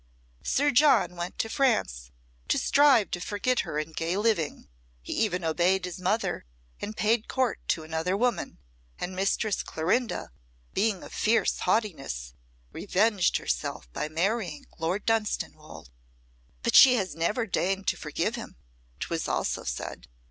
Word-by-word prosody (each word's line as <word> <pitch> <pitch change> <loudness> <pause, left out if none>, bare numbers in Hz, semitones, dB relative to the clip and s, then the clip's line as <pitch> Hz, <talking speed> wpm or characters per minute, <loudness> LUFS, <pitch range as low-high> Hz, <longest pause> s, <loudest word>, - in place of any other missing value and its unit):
Sir 290 +2 +2
John 245 - +4
went 175 +1 -5
to - - 0
France 220 - 0 0.4
to - - +2
strive 280 -7 +4
to 175 - -2
forget 210 +7 0
her 150 - -2
in 155 +1 -3
gay 165 +4 -2
living; 205 - 0 0.4
he - - -5
even 185 -5 0
obeyed 180 +4 +2
his 180 0 -6
mother 185 - -1 0.3
and 215 +1 -6
paid 220 +1 +2
court 260 -4 0
to 160 - 0
another 160 +4 -1
woman, 245 +2 -1 0.4
and 185 +1 -5
Mistress 195 +2 0
Clorinda, 185 - -1 0.4
being 210 -2 0
of - - -11
fierce 225 +2 +2
haughtiness, 135 - -1 0.4
revenged 200 -1 +2
herself - - -3
by 150 - -3
marrying 175 -1 -1
Lord 175 +5 -1
Dunstanwolde." 220 - -2 0.7
"But - - 0
she 255 -2 +9
has 195 -6 -1
never 205 +9 0
deigned 195 -1 -1
to - - 0
forgive - - -2
him," - - -7 0.5
'twas - - -2
also - - -1
said. - - -5
195 Hz, 140 wpm, -27 LUFS, 165-225 Hz, 0.7 s, she